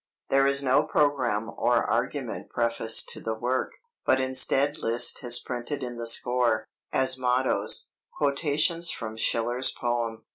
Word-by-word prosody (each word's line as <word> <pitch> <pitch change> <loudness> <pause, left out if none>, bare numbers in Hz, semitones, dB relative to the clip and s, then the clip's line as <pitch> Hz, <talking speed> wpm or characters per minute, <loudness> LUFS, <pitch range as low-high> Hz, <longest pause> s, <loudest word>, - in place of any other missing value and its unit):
There 135 0 +3
is 140 0 +2
no 130 -1 +3
programme 125 -7 0
or - - +1
argument - - -3
prefaced 115 -1 0
to - - -2
the 110 0 -3
work, 125 +3 -2 0.3
but 130 - +2
instead 135 +3 +2
Liszt 115 +2 +1
has 120 -1 +2
printed 125 +3 -4
in 120 -1 -6
the 115 0 -4
score, 120 -1 +1 0.3
as 130 0 +1
mottoes, 125 +1 +1 0.3
quotations 155 +4 +1
from 110 -5 -5
Schiller's 120 +3 +1
poem. 115 -2 -3
125 Hz, 140 wpm, -26 LUFS, 115-135 Hz, 0.3 s, There